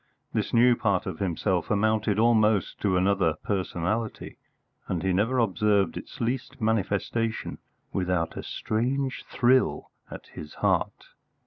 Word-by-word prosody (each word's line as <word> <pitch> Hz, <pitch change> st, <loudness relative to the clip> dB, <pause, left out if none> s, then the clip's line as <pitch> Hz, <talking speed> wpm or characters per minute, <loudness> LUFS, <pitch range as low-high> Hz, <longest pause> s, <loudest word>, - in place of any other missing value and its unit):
This -, -, -1 dB
new 120 Hz, +1 st, +5 dB
part -, -, 0 dB
of 80 Hz, -, -5 dB
himself 90 Hz, -1 st, -1 dB
amounted 110 Hz, 0 st, +1 dB
almost 110 Hz, -3 st, +3 dB
to 95 Hz, -3 st, +2 dB
another 95 Hz, -4 st, +2 dB
personality, 100 Hz, +3 st, -2 dB, 0.5 s
and 90 Hz, -1 st, -2 dB
he 95 Hz, -1 st, +1 dB
never 110 Hz, +8 st, +1 dB
observed 105 Hz, -2 st, +2 dB
its -, -, -9 dB
least 130 Hz, +3 st, -3 dB
manifestation 110 Hz, +1 st, -1 dB, 0.3 s
without 90 Hz, -3 st, -1 dB
a -, -, -4 dB
strange 130 Hz, +5 st, -2 dB
thrill 125 Hz, +1 st, +2 dB, 0.2 s
at -, -, -9 dB
his 75 Hz, -1 st, -9 dB
heart. -, -, -1 dB
105 Hz, 125 wpm, -26 LUFS, 95-115 Hz, 0.5 s, new